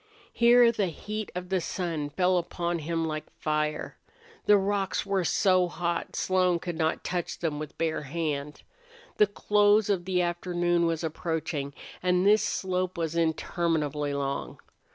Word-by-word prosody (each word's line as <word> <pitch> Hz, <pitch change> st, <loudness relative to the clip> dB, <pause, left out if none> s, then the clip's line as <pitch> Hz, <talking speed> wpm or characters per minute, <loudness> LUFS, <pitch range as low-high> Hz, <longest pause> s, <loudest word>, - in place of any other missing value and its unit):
Here 240 Hz, 0 st, +6 dB
the 210 Hz, -4 st, 0 dB
heat 210 Hz, +5 st, -5 dB
of 180 Hz, 0 st, -5 dB
the 190 Hz, -2 st, +1 dB
sun 165 Hz, -5 st, -3 dB
fell 180 Hz, +3 st, +2 dB
upon 170 Hz, 0 st, -2 dB
him 165 Hz, +1 st, -2 dB
like 155 Hz, -1 st, -4 dB
fire. 150 Hz, 0 st, -2 dB, 0.5 s
The 210 Hz, -, +7 dB
rocks 195 Hz, -1 st, 0 dB
were 195 Hz, -2 st, 0 dB
so 185 Hz, +1 st, +3 dB
hot 175 Hz, 0 st, -3 dB
Slone 185 Hz, -2 st, +2 dB
could 175 Hz, 0 st, -5 dB
not 160 Hz, 0 st, 0 dB
touch 175 Hz, -2 st, -3 dB
them 155 Hz, -3 st, -2 dB
with 155 Hz, -1 st, -7 dB
bare 165 Hz, -1 st, -1 dB
hand. 150 Hz, -1 st, -4 dB, 0.5 s
The 210 Hz, -, +5 dB
close 205 Hz, +1 st, +3 dB
of 180 Hz, -3 st, -1 dB
the 185 Hz, -1 st, 0 dB
afternoon 175 Hz, 0 st, +1 dB
was 165 Hz, 0 st, -1 dB
approaching, 160 Hz, -3 st, -3 dB, 0.3 s
and 180 Hz, 0 st, +2 dB
this 210 Hz, +1 st, +6 dB
slope 185 Hz, -3 st, -1 dB
was 165 Hz, -1 st, -2 dB
interminably 160 Hz, -3 st, 0 dB
long. 140 Hz, 0 st, -3 dB
175 Hz, 150 wpm, -28 LUFS, 160-185 Hz, 0.5 s, The